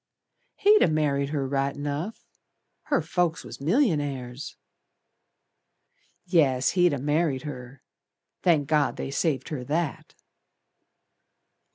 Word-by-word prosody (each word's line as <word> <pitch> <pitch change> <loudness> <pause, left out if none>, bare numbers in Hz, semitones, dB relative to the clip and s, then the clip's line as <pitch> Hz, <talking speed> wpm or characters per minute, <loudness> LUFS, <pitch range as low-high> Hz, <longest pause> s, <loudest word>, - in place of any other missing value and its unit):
"He'd 420 +1 +5
ha' - - +4
married 145 -3 +1
her 145 -3 -1
right 140 0 -1
enough, 145 +8 -4 0.6
Her 285 - +1
folks 170 0 0
was - - -10
millionaires." 145 - -1 1.7
"Yes, 145 -8 +3
he'd 180 -1 +3
ha' - - -1
married 145 -1 0
her! 130 -3 -8 0.6
Thank 155 -6 +3
God, 150 -2 +2
they 135 - -4
saved 140 -3 -1
her 145 -5 -4
that." 155 +1 -3
145 Hz, 105 wpm, -26 LUFS, 140-165 Hz, 1.7 s, He'd